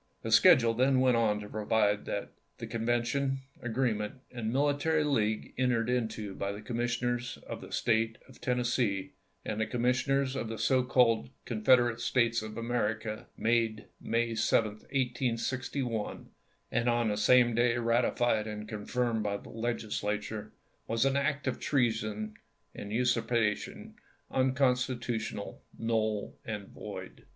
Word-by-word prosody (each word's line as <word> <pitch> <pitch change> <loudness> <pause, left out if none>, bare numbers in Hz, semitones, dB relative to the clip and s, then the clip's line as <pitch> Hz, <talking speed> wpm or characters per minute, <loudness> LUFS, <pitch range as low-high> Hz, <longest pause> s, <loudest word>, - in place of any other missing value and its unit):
The 115 - -3
schedule 115 +1 +7
then 130 +3 +3
went 130 -1 +4
on 110 -3 +2
to 105 - -7
provide 105 -1 +1
that, 100 - -4
" - - -44
The - - -6
convention, 120 +4 0 0.2
agreement, 115 -3 -1 0.2
and 115 -3 -3
military 145 +4 +2
league 110 -7 0
en 130 -1 +3
tered 120 0 +1
into 110 -4 -3
by 100 +1 -3
the 100 - -8
Commissioners 120 +1 -1
of - - -6
the - - -10
State 115 0 +1
of 130 - -17
Tennessee 120 -5 0 0.3
and 110 +1 -2
the 110 - 0
Commissioners 130 +2 +1
of 125 - -2
the 115 - -4
so 130 +2 +3
called 125 -3 +3 0.2
Confederate 120 +1 +3
States 115 -1 +2
of 110 0 -7
America, 110 -2 -2
made 115 -2 +1
May 115 0 0
7, 110 -1 +2
1861, 125 0 -2 0.4
and 120 +1 +1
on 120 -1 +2
the 105 - 0
same 120 +3 +5
day 120 +1 +2
ratified 115 -1 +2
and 105 0 -6
confirmed 115 +2 -1
by 100 -1 -1
the - - -13
Legislature, 110 -2 -3 0.4
was 115 +3 +1
an 135 0 +2
act 140 0 0
of 130 - -1
treason 110 -5 0 0.4
and 100 - -7
usurpation, 115 -2 0 0.4
unconstitutional, 125 -5 0 0.2
null, 110 -2 -1
and 105 -3 -5
void." - - -9
115 Hz, 140 wpm, -30 LUFS, 110-125 Hz, 0.4 s, schedule